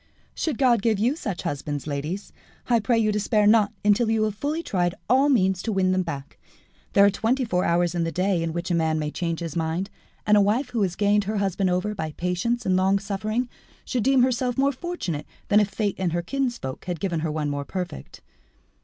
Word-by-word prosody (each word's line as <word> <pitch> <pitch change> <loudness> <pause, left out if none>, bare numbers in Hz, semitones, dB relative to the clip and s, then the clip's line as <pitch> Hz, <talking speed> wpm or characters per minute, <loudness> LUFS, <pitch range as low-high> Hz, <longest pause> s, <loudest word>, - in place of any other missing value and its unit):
"Should 305 -7 -2
God 245 -5 +3
give 220 -1 +2
you 240 +8 +1
such 205 - -4
husbands, 145 0 -3
ladies, 150 +7 -4 0.3
I 235 -2 +4
pray 230 +2 +1
you 215 -1 +2
despair 210 0 +1
not 210 -1 +5
until 215 +2 +4
you 225 -1 +2
have 215 -1 0
fully 295 +10 -3
tried 175 - 0
all 270 +3 +4
means 190 -8 +2
to 225 - -2
win 190 -2 +2
them 185 0 +2
back. 145 -5 -6 0.5
There 200 - +7
are 200 - +5
twenty 245 +6 0
four 180 -5 0
hours 170 0 +2
in 175 -1 0
the 165 - -1
day 185 0 +1
in 165 0 -1
which 170 +2 -3
a - - +2
man 160 -2 +1
may 150 -1 -2
change 165 -1 -3
his 165 -3 -5
mind, 170 +4 -2 0.3
and 210 - +5
a 205 - +6
wife 235 +6 +1
who 235 -3 -1
has 185 -3 0
gained 205 +1 +2
her 215 +2 -2
husband 195 -1 0
over 185 +4 0
by 160 -6 -4
patience 180 +9 -1
and 185 - +2
longsuffering 200 +5 0 0.4
should 250 - -1
deem 265 -1 +4
herself 250 -1 0
more 275 +1 +3
fortunate 260 - -4 0.2
than 205 - +6
if 210 -1 +2
fate 200 0 -2
and 180 -3 0
her 175 0 -1
kinsfolk 240 - -3
had 175 -3 -3
given 170 -2 -1
her 160 0 -2
one 150 -1 -2
more 145 0 -3
perfect." 180 - -6
195 Hz, 220 wpm, -24 LUFS, 170-225 Hz, 0.5 s, There